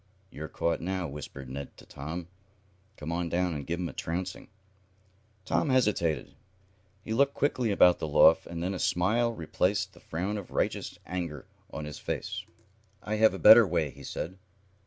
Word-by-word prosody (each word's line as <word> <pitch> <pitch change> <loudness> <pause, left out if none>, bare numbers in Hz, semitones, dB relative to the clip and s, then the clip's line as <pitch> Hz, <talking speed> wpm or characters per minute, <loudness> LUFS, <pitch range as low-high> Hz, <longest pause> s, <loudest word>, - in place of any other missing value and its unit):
"You're 80 +1 -6
caught 85 +3 -1
now," 90 0 -2
whispered 70 -2 -8
Ned 70 +2 -7
to - - -14
Tom. 80 +5 -6 0.7
"Come 75 +2 -5
on 85 0 -1
down, 90 0 0
and 70 -2 -5
give 85 +1 -2
'em 90 - -1
a - - -8
trouncing." 90 +3 -4 1.0
Tom 150 - +1
hesitated. 105 - +1 0.7
He 110 - -3
looked 140 +4 +3
quickly 125 -5 +1
about 90 -3 +5
the - - -3
loft, 75 +2 +5
and 85 0 -5
then 95 +2 -1
a 95 - -4
smile 110 +7 +2
replaced 90 +1 -1
the - - -16
frown 95 +6 -3
of 95 - -10
righteous - - -2
anger 85 -7 -4 0.3
on 75 +1 -5
his 75 - -7
face. - - -4 0.6
"I 110 0 -2
have 110 +1 +5
a - - -4
better - - +9
way," - - 0
he - - -13
said. 95 +3 -5
90 Hz, 175 wpm, -29 LUFS, 80-100 Hz, 1.0 s, better